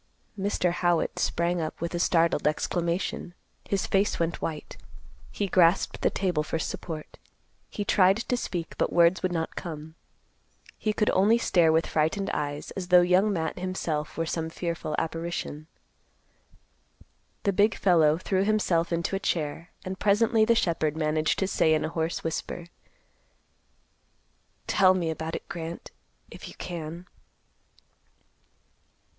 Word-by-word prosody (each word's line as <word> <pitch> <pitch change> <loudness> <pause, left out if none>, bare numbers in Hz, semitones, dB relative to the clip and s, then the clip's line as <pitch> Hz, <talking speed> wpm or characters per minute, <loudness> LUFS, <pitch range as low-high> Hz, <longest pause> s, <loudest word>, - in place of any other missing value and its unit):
Mr. 195 -3 0
Howitt 175 -1 0
sprang 170 0 0
up 155 - -4
with 170 +1 -3
a 175 - -1
startled 170 -2 +2
exclamation. 170 +3 -2 0.3
His 195 -1 0
face 195 +1 +1
went 165 0 -1
white. 155 -2 -5 0.6
He 205 - -2
grasped 180 -1 +3
the - - +3
table 180 -6 0
for 150 - -2
support. 160 0 -6 0.5
He 205 - -4
tried 190 0 +4
to 240 +2 -1
speak, 175 -8 -4
but - - +1
words 170 +1 +4
would 185 - 0
not 165 -2 -3
come. 160 -2 -7 0.9
He 215 - 0
could 210 0 +1
only 205 +5 +4
stare 175 -8 +3
with 160 +1 +2
frightened 160 +6 0
eyes, 145 0 -3
as 185 -2 -5
though 180 0 +7
Young 180 +4 +3
Matt 165 -2 -2
himself 170 -5 -3
were 165 - 0
some 160 0 -2
fearful 165 -2 -3
apparition. 165 -2 -4 1.8
The 200 - +1
big 210 +4 +3
fellow 160 -5 +4
threw 190 +1 0
himself 195 -6 +1
into 170 +3 -1
a - - -1
chair, 165 -2 -2 0.2
and 185 0 -5
presently 220 +2 +3
the 235 +1 +4
shepherd 160 -6 0
managed 155 0 +1
to 190 - 0
say 160 -4 +3
in 155 - 0
a - - -2
hoarse 165 0 -2
whisper, 165 +1 -4 2.0
"Tell 185 -1 +4
me 170 -3 -1
about 160 +1 -4
it, - - -7
Grant, 165 0 -7 0.4
if - - -9
you - - -11
can." 170 0 -6
170 Hz, 145 wpm, -27 LUFS, 160-190 Hz, 2.0 s, though